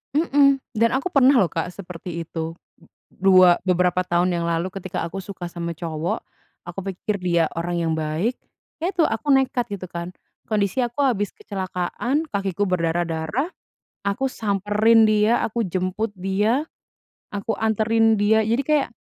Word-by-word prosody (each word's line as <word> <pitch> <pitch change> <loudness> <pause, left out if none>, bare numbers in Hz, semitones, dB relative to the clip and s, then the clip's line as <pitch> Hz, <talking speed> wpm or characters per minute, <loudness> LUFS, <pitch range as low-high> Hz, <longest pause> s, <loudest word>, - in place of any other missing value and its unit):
mhm, 285 -3 +4 0.2
dan 230 +1 +3
aku 320 +8 -1
pernah 275 0 +6
loh, 190 -7 +3
Kak, 165 +1 -2
seperti 175 -2 -7
itu. 165 0 -5 0.6
Dua 185 -2 +5
beberapa 180 0 +2
tahun 175 0 +1
yang 170 -1 -1
lalu 170 +2 0
ketika 185 -2 -4
aku 195 +3 -5
suka 185 -2 -7
sama 170 -1 -4
cowok, 165 0 -3 0.4
aku 175 +2 -6
pikir 205 +3 -3
dia 170 -2 +2
orang 175 +1 -2
yang 160 - +1
baik. 160 +9 -1 0.5
Ya 345 - +1
itu, 350 -3 +3
aku 225 +6 -2
nekat 265 -2 +2
gitu 185 -2 -6
kan, 170 +1 -6 0.4
kondisi 210 +2 0
aku 240 +4 -3
habis 205 -6 0
kecelakaan, 200 - -2
kakiku 200 -2 -1
berdarah-darah, 170 - -1 0.6
aku 200 +7 0
samperin 210 +2 +3
dia, 215 +2 +3
aku 230 +1 -1
jemput 185 +4 -2
dia, 205 +8 +1 0.7
aku 205 +2 -2
anterin 220 0 +2
dia. 220 +1 +4
Jadi 230 +5 +1
kayak 300 -1 +2
195 Hz, 150 wpm, -23 LUFS, 175-225 Hz, 0.7 s, pernah